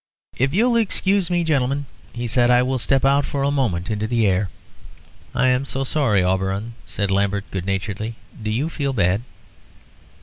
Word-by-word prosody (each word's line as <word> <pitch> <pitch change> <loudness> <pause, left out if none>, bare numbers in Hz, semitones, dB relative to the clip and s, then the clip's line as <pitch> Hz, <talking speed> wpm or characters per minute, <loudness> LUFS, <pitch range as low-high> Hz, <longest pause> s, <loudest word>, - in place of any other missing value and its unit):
"If 135 +2 +1
you'll 235 - +3
excuse 195 -4 +2
me, 175 -1 +1
gentlemen," 140 -2 0 0.3
he 120 0 -5
said, 120 +1 +2
"I 125 0 +5
will 130 0 -1
step 135 +3 +2
out 140 +1 +4
for 140 0 -2
a 140 - +2
moment 110 -11 -1
into 105 0 -1
the 115 -1 +1
air." 95 0 +1 0.9
"I'm 130 +1 +3
so 135 -1 -3
sorry, 130 -9 +2
Auberon," 95 +4 -1
said 100 -2 -2
Lambert, 100 +1 0
good 95 -1 -4
naturedly; 100 +3 -3 0.3
"do 110 - -3
you 120 +8 0
feel 140 -4 -2
bad?" 100 -2 +2
120 Hz, 170 wpm, -21 LUFS, 100-140 Hz, 0.9 s, I